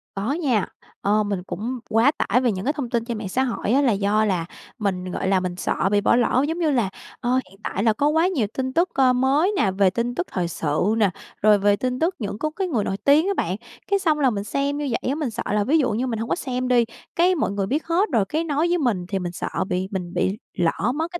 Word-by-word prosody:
Có 200 +7 -1
nha. 270 - +1 0.4
Ờ, 210 +1 +2
mình 200 -3 -3
cũng 240 +6 -4
quá 225 +6 +4
tải 250 -4 +1
về 245 - +2
những 190 -1 -4
cái 290 - +1
thông 275 -6 -4
tin 235 -2 -1
trên 235 -3 -3
mạng 205 -3 -5
xã 260 +6 +1
hội 235 -4 -2
á 275 +4 +4
là 255 -5 +3
do 205 +2 +2
là 185 -5 0 0.3
mình, 185 -3 -2
gọi - - -2
là, 190 -1 +3
mình 180 -1 -3
sợ 190 - 0
bị 205 - +3
bỏ 225 - +4
lỡ, 245 +2 +2
giống 330 +2 -2
như 315 -3 +2
là, 235 -8 +1 0.3
ờ, 250 +1 +1
hiện 195 +2 -19
tại 195 - -2
là 225 -2 +4
có 285 +6 +1
quá 320 +3 +3
nhiều 275 - 0
tin 260 0 -2
tức, 350 +2 +2
ơ, 260 -2 +4
mới 275 +9 +2
nè, 195 - +2
về 190 0 +3
tin 235 +5 -2
tức 355 - -2
thời 175 -2 -1
sự 165 +5 0
nè, 205 -4 +4 0.3
rồi 210 0 +6
về 205 +1 +3
tin 255 +3 -2
tức 340 +4 +1
những 205 -2 -4
có 310 - 0
cái 385 -2 -1
người 240 -11 0
nổi 195 - -2
tiếng 285 - +4
á 400 - +1
bạn. 180 +3 0 0.3
Cái 400 0 +2
xong 315 -5 +1
là 270 -3 +4
mình 200 -3 -3
xem 280 +5 -1
như 290 -1 -2
vậy - - -2
á, 275 - 0
mình 295 -5 -2
sợ 220 - -5
là 210 0 +2
ví 290 +9 +3
dụ 260 -7 +2
như 240 +5 -1
mình 230 -3 -2
hông 230 +1 -4
có - - +2
xem 255 -6 -3
đi, 240 -2 +4 0.3
cái 360 +2 +4
mọi 295 - 0
người 200 -1 -2
biết 295 +7 -1
hết 350 +5 +1
rồi 220 -4 +3
cái 315 +11 -1
nói 310 +1 0
với 350 - +2
mình 230 - 0
thì 195 0 -2
mình 175 -1 -4
sợ - - -4 0.2
bị 185 +1 -1
mình 180 -2 -4
bị 195 +3 0 0.2
lỡ 175 +7 0
mất 325 +3 -2
cái 345 - -5
240 Hz, 280 wpm, -23 LUFS, 200-285 Hz, 0.4 s, rồi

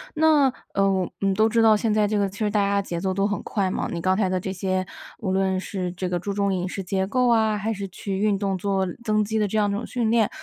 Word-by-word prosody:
那 305 -3 +4 0.2
呃， 195 -2 +1
嗯， 195 -1 +2
都 215 +2 +4
知 230 +1 +2
道 220 -1 +6
现 220 0 0
在 215 0 +3
这 210 +1 0
个 200 - +2
其 195 +2 -11
实 215 -2 +1
大 210 - +1
家 200 0 +1
节 175 -3 -4
奏 190 +1 -1
都 195 +1 +1
很 205 0 -1
快 195 -3 -1
嘛， - - -2
你 170 - -4
刚 185 +2 +2
才 205 -3 +2
的 185 0 0
这 190 - -4
些 185 0 -1 0.3
无 205 -6 -2
论 190 0 +1
是 185 -1 -3
这 180 0 -3
个 175 -1 -1
注 200 +3 -4
重 200 -1 0
饮 180 0 -2
食 195 +1 -5
结 190 +1 -1
构 250 +4 +2
啊， 220 -2 +3
还 210 +2 -2
是 200 -2 -4
去 195 +1 -5
运 205 -1 +2
动， 195 -1 -1
做 195 0 0 0.2
增 215 -1 +2
肌 220 +1 -1
的 210 - +2
这 215 - -2
样 205 -1 +2
一 - - -1
种 205 +4 -3
训 235 -3 -1
练， 225 -3 +3
200 Hz, 305 characters per minute, -24 LUFS, 190-215 Hz, 0.3 s, 道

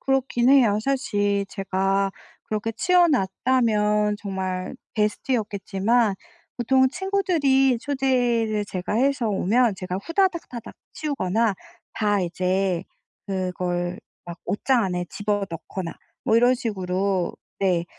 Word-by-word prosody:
그렇긴 265 -2 +1
해요. 245 -7 +5
사실 205 -7 0
제가 195 0 0 0.3
그렇게 215 +1 -2
치워 355 +8 +4
놨다면 210 - +2
정말 190 +1 -4 0.2
베스트였겠지만 210 0 0 0.4
보통 260 +2 +3
친구들이 320 -9 +2
초대를 245 -6 +1
제가 185 +1 -3
해서 260 -1 +2
오면 215 +3 +2
제가 185 0 -4
후다닥다닥 335 - -1 0.2
치우거나 225 -7 0 0.4
다 205 -2 +1
이제 185 +1 0 0.4
그걸 180 -2 -2 0.3
막 175 0 -8
옷장 245 +3 +1
안에 180 -2 -2
집어 205 -1 -1
넣거나 165 +2 -6 0.3
뭐 220 - +3
이런 245 +2 +5
식으로 190 -5 -1 0.3
네 180 -3 +1
210 Hz, 245 characters per minute, -24 LUFS, 190-255 Hz, 0.4 s, 해요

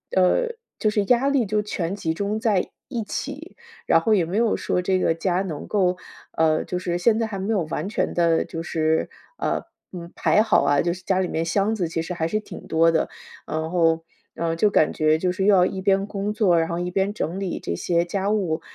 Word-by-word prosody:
呃， 330 - +3 0.3
就 215 - +2
是 210 -1 +1
压 250 +4 +3
力 280 -4 +2
就 210 +1 0
全 190 -4 -3
集 165 -5 -2
中 200 +5 -2
在 215 -5 +1 0.2
一 240 -4 -3
起。 - - -6 0.3
然 165 - +5
后 220 +6 +2
也 180 -4 +2
没 180 +5 -3
有 230 -1 +2
说 180 - -1
这 185 +1 +1
个 165 - +2
家 180 +2 0
能 160 -6 -6
够 185 -3 +1 0.4
呃， 160 -1 +3
就 180 - -3
是 175 -1 -2
现 220 +5 +3
在 225 - 0
还 205 -3 -5
没 200 +4 -1
有 200 - +1
完 155 - -3
全 210 - -1
地 170 -1 +2
就 165 - -6
是， 160 -1 0 0.3
呃， - - -1 0.3
嗯， 175 -2 -8
排 210 - +3
好 215 -8 +3
啊， 140 0 +3
就 170 0 0
是 185 +1 -11
家 190 -1 +1
里 185 - 0
面 165 -1 -2
箱 200 +6 +1
子 180 -5 -1
其 165 0 -2
实 170 +2 -5
还 160 -1 -1
是 215 +5 0
挺 215 - -10
多 165 +1 +4
的。 160 - 0 0.4
然 160 +1 -3
后， 165 -2 +2 0.3
嗯， 165 -1 -1
就 210 +5 +4
感 155 - +3
觉 155 0 +2
就 180 +2 0
是 190 +1 -1
要 190 -3 +6
一 190 0 -3
边 195 0 +2
工 205 0 -3
作， 195 -6 +3
然 165 - 0
后 170 0 -2
一 175 0 -2
边 195 +2 0
整 180 -2 -3
理 195 -3 -3
这 85 - -3
些 170 - 0
家 195 +3 -2
务， 180 -7 0
185 Hz, 250 characters per minute, -23 LUFS, 165-205 Hz, 0.4 s, 要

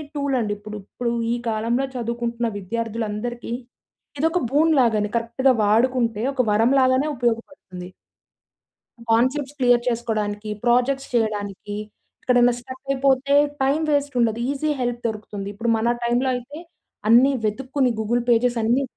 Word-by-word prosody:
Tool 280 -2 -1
అండి 210 -3 -1
ఇప్పుడు. 210 +1 -8
ఇప్పుడు 235 -1 -3 0.2
ఈ - - +1
కాలంలో 230 +4 0
చదువుకుంటున్న 235 0 -2
విద్యార్థులందరికీ, 230 +3 -4 0.7
ఇదొక 325 +4 +2
బూన్ 315 +3 +4
లాగ 235 -2 +3
అని 210 0 -2
కరెక్ట్‌గా 235 +3 +2
వాడుకుంటే, 230 0 +2
ఒక 265 - +2
వరం 225 +4 +3
లాగానే 260 +3 +3
ఉపయోగపడుతుంది. 230 -6 -4 1.2
కాన్సెప్ట్స్ 260 +5 +1
క్లియర్ 245 -2 +4
చేసుకోడానికి, 215 -3 -2 0.2
ప్రాజెక్ట్స్ 250 +3 +2
చేయడానికి, 205 -3 -2 0.5
ఎక్కడైనా 245 -1 +4
ష్ట్ర‌క్ 260 +2 -11
అయిపోతే 275 0 +2 0.3
టైమ్ 280 +4 +1
వేస్ట్ 285 -1 0
ఉండదు. 230 -1 +1
ఈజీ 285 +2 -2
హెల్ప్ 240 -1 -2
దొరుకుతుంది. 210 -2 -6
ఇప్పుడు 230 +3 -2
మన 235 +2 +1
టైమ్‌లో 240 +2 +1
అయితే, 250 +5 -7 0.5
అన్ని 245 +5 +6
వెతుక్కుని 255 +4 0
గూగుల్ 235 +3 0
పేజెస్ 240 +1 +3
అన్ని 240 +5 +2
240 Hz, 130 wpm, -22 LUFS, 225-260 Hz, 1.2 s, అన్ని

